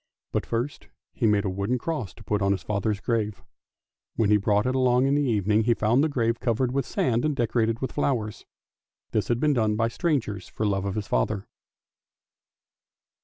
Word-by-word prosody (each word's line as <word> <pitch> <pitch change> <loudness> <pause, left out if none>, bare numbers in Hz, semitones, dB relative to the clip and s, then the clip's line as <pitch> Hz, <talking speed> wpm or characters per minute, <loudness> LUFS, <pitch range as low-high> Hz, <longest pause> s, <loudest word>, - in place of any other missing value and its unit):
But - - -1
first 120 +5 -3 0.3
he 115 - +1
made 105 -1 +2
a - - +1
wooden 100 +6 -1
cross 125 - -3
to 110 - -14
put 105 -1 -1
up 100 - +2
on 100 - +4
his 95 -4 -4
father's 105 0 -1
grave; 110 -2 -2 0.7
when 105 -2 +2
he 105 - +6
brought 105 +1 +1
it 130 - +1
along 130 0 +3
in 135 - +2
the 145 - +3
evening 110 -4 +2
he 120 0 +3
found 115 +7 +2
the 160 - +2
grave 115 -4 0
covered 120 +1 0
with 135 -2 -1
sand 120 -1 0
and 150 -2 +1
decorated 115 -2 0
with 130 - -2
flowers. 120 -7 -2 0.6
This - - 0
had 120 -1 +1
been 150 +2 +3
done 110 -4 +1
by 115 +1 +1
strangers 115 - -1
for 110 - -3
love 100 -1 0
of 100 - -2
his 105 -2 -2
father. 105 -2 0
115 Hz, 200 wpm, -26 LUFS, 105-125 Hz, 0.7 s, he